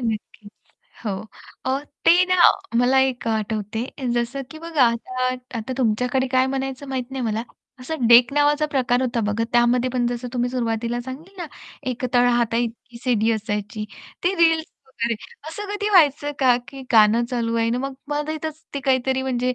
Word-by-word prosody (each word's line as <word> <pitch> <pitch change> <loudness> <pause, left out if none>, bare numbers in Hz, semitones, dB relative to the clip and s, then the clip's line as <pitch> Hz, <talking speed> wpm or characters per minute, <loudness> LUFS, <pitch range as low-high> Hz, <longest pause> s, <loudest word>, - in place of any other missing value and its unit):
नक्कीच. 220 -2 -5 0.5
हो. 215 - -1 0.6
अ, 265 +1 +1 0.2
ते 355 +2 +6
ना 365 0 +2 0.4
मला 255 +2 +4
एक 245 -2 -10
आठवते. 220 0 -2 0.3
जसं 240 +3 -1
की 315 - -9
बघा 325 -5 +1
आता 255 +2 -3 0.3
आता 225 +4 -4
तुमच्याकडे 250 +2 +1
काय 255 0 +4
म्हणायचं 270 +1 -4
माहीत 260 -1 -3
नाही 265 -1 -4
मला. 220 0 -1 0.4
असं 260 -1 -2
डेक 240 +2 +7
नावाचा 295 +1 +3
प्रकार 250 -2 +2
होता 245 -2 0
बघा 220 +2 0
त्यामध्ये 240 +1 +3
पण 245 -1 0
जसं 245 +1 -3
तुम्ही 245 -1 0
सुरुवातीला 235 -1 -1
सांगितल 280 +10 -9
ना - - -5 0.4
एक 255 +1 -4
तळहाताइतकी 240 -1 +1
सीडी 230 -3 +2
असायची 210 -1 -3 0.4
ते 365 +2 +2
रील्स 325 -2 +3 0.2
वगैरे 235 -3 -2 0.3
असं 320 +6 -6
कधी 415 0 -1
व्हायचं 295 -5 +4
का 255 -4 +5
की 270 -1 -9
गाणं 220 +1 +5
चालू 230 -2 -1
आहे 230 0 +1
ना 240 - 0
मग 270 +1 -4
मध्ये 295 +1 -2
इथेच 315 0 -6
ते 280 - -2
काहीतरी 265 -1 +1
म्हणजे 255 -1 0
250 Hz, 165 wpm, -22 LUFS, 235-275 Hz, 0.6 s, डेक